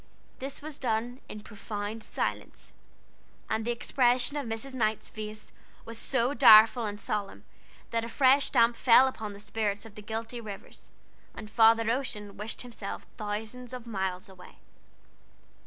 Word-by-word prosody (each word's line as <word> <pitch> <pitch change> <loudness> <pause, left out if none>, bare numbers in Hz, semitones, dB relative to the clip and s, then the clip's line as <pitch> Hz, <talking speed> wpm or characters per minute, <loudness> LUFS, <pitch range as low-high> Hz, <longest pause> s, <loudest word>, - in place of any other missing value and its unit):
This 275 +2 -6
was 305 -1 -7
done 240 +1 -2
in 210 - -8
profound 210 +1 -6
silence; - - -4 0.8
and 220 0 0
the 235 - -3
expression 245 +2 +1
of 285 -4 -3
Mrs. 225 +4 -5
Knight's 220 -4 0
face 215 0 -7 0.3
was 230 0 -7
so 260 0 0
direful 225 -3 +7
and 205 0 -6
solemn, 205 -1 -4 0.5
that 230 -1 0
a 230 - -5
fresh 270 +3 +4
damp 235 +1 +4
fell 255 +2 +6
upon 220 -5 -5
the 200 - -11
spirits 210 -1 -2
of 225 - -12
the 210 - -10
guilty 225 +3 -5
Rivers, 205 -3 -10 0.5
and 215 0 -9
Father 225 0 +5
Ocean 210 -6 -4
wished 210 +4 -6
himself 230 -5 -7
thousands 220 +4 -5
of 250 -2 -7
miles 190 -5 -3
away. 190 -2 -15
225 Hz, 150 wpm, -29 LUFS, 210-245 Hz, 0.8 s, direful